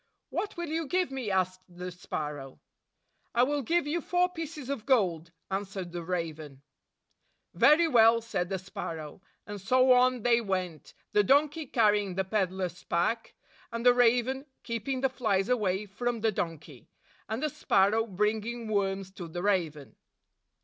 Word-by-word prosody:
"What 420 -3 -3
will 345 -2 -4
you 320 0 -2
give 360 0 0
me?" 260 -5 -3
asked 185 -1 0
the 180 +1 -7
sparrow. 150 -6 -6 0.8
"I 240 - +5
will 290 +2 +1
give 335 +5 +1
you 325 +4 -1
four 360 +2 +1
pieces 325 -5 -7
of 275 -6 -4
gold," 180 - +2 0.2
an 195 +1 0
swered 190 -3 -7
the 175 0 -5
raven. 160 -5 -5 0.9
"Very 330 +3 +5
well," 230 -4 +6
said 200 -6 -3
the 195 - -1
sparrow; 165 -3 -7 0.2
and 205 -1 -7
so 255 +6 +4
on 250 -2 +3
they 240 -1 +4
went, 185 -6 -4 0.2
the 210 - +4
donkey 295 +7 +2
carrying 210 -5 +2
the 190 - +1
peddler's 185 -3 -2
pack, 220 +7 -1 0.4
and 230 +1 -4
the 245 - +8
raven 245 +3 +2 0.2
keeping 235 +3 -3
the 270 - +4
flies 215 -6 0
away 210 -5 +1
from 235 +3 -3
the 220 0 +2
donkey, 160 - -5 0.4
and 225 +6 -3
the 305 - +1
sparrow 220 -2 +2
bringing 215 +3 -1
worms 195 -2 -1
to 180 -3 -8
the 175 +2 -5
raven. 165 -8 -1
210 Hz, 155 wpm, -29 LUFS, 180-255 Hz, 0.9 s, the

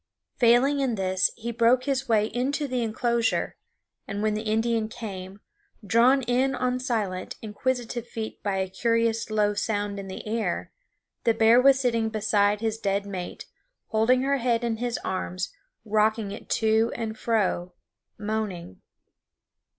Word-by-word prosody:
Failing 250 +4 +4
in 260 -4 0
this 185 -2 +1
he 235 +1 -5
broke 235 +2 +3
his 270 -1 -1
way 215 -2 +4
into 275 +6 -1
the 255 -2 -1
inclosure; 235 +1 0 0.5
and 200 +1 -3
when 215 -1 +2
the 210 - -2
Indian 225 0 0
came, 200 -4 -7 0.4
drawn 250 +5 +4
in 255 +3 +1
on 250 0 0
silent, 215 -8 -2
inquisitive 240 +2 -2
feet 220 -2 -6
by 200 -2 -1
a 190 0 0
curious 230 +3 0
low 210 -1 +2
sound 205 -1 -2
in 195 - -7
the 190 - -7
air, 225 +1 -2 0.5
the 230 - +3
bear 225 +2 +6
was 270 0 +6
sitting 230 -4 +1
beside 210 -1 +1
his 225 -1 -1
dead 200 -1 0
mate, 185 -3 -6 0.4
holding 245 +3 +3
her 280 +1 +2
head 240 -2 +1
in 230 -1 -1
his 240 0 -2
arms, 185 0 -3 0.3
rocking 215 -1 +1
it 205 - -9
to 220 +1 +2
and 225 -2 -4
fro, 190 -6 0 0.4
moaning. 210 - -4
225 Hz, 150 wpm, -26 LUFS, 205-240 Hz, 0.5 s, bear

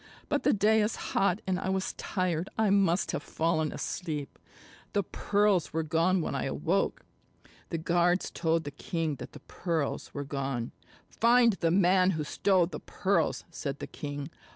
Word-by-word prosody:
But - - +1
the - - +3
day 215 +2 +4
is 210 +2 0 0.2
hot, 195 +1 +1
and 185 -1 0
I 190 - -2
was 190 0 -1
tired. 180 -3 -2
I 220 -2 +3
must 195 -3 +3
have - - -2
fallen 160 0 0
asleep. 155 -6 -4 0.5
The 200 - +2
pearls 200 -2 +1
were 160 0 0
gone 165 +4 +2
when - - -3
I 140 - -1
awoke." 165 +8 -1 0.6
The 165 - -2
guards 175 +2 +1
told 165 -1 0
the 145 - -5
king 155 0 -3
that - - -9
the - - -11
pearls 165 -5 -3
were 145 - -4
gone. 135 -4 -3 0.4
"Find 235 0 +4
the 170 -3 0
man 185 +1 +4
who 155 - -1
stole 185 +4 +2
the 175 - -7
pearls," 195 +1 0
said 140 -4 -4
the - - -5
king. 145 +1 -6
175 Hz, 170 wpm, -29 LUFS, 155-190 Hz, 0.6 s, day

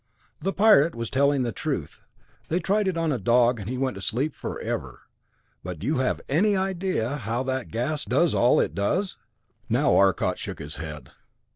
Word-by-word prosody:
"The 195 +5 0
Pirate 195 -7 +5
was 115 -1 -4
telling 140 0 +2
the 120 - -1
truth. - - -4 0.5
They 165 - +1
tried 200 +2 +1
it 185 -3 -1
on 165 -2 0
a 130 - -1
dog 120 +3 +3
and 100 +1 -6
he 130 - -3
went 130 0 0
to 100 - -8
sleep 130 +9 -1
forever. - - -5 0.6
But 90 -1 -5
do 90 - -7
you 150 +1 +1
have 130 - 0
any 200 +9 +2
idea 185 -9 -1
how 120 0 -2
that 130 -2 -2
gas 135 +7 -2
does 170 -3 +2
all 120 - +4
it - - 0
does?" 180 - -1 0.5
Now 125 +6 +3
Arcot 95 -3 +2
shook - - -5
his 75 +1 -8
head. 75 -2 -8
130 Hz, 185 wpm, -25 LUFS, 115-165 Hz, 0.6 s, Pirate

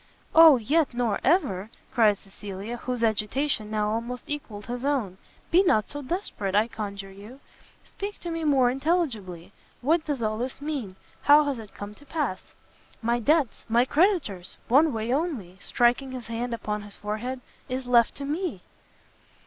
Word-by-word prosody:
"O 320 -4 +9
yet 280 +3 +1
nor 240 -4 0
ever!" 220 - +2 0.2
cried 215 -4 +4
Cecilia, 200 +3 -7
whose 245 0 -3
agitation 220 +2 0
now 210 -1 0
almost 235 +3 -4
equalled 225 -9 -5
his 245 +1 -5
own, 245 -10 -1 0.3
"be 350 +3 +6
not 215 - +2
so 290 - -5
desperate, 255 - -3
I 215 +2 +4
conjure 200 -3 -6
you! 210 +7 -12 0.4
speak 405 +1 -7
to 345 - -4
me 330 0 -3
more 270 -5 +4
intelligibly, 245 - -2 0.3
what 310 +5 +2
does 285 -6 -2
all 215 0 -1
this 255 +2 -4
mean? 280 -10 -4 0.3
How 295 +1 +7
has 280 -4 -2
it 215 -3 -11
come 205 0 -7
to 290 - -18
pass?" 285 - -3 0.5
"My 235 +1 +1
debts! 285 0 +1
my 235 +2 +4
creditors! 290 - +1
one 290 +6 +5
way 225 +1 -1
only," 265 - -2
striking 245 +4 +1
his 250 -3 -6
hand 230 +1 -3
upon 210 -2 -3
his 205 -1 -9
forehead, 220 +5 -4 0.3
"is 255 0 -3
left 240 -2 +4
for 280 - -5
me!" 300 - -3
240 Hz, 165 wpm, -26 LUFS, 210-290 Hz, 0.5 s, O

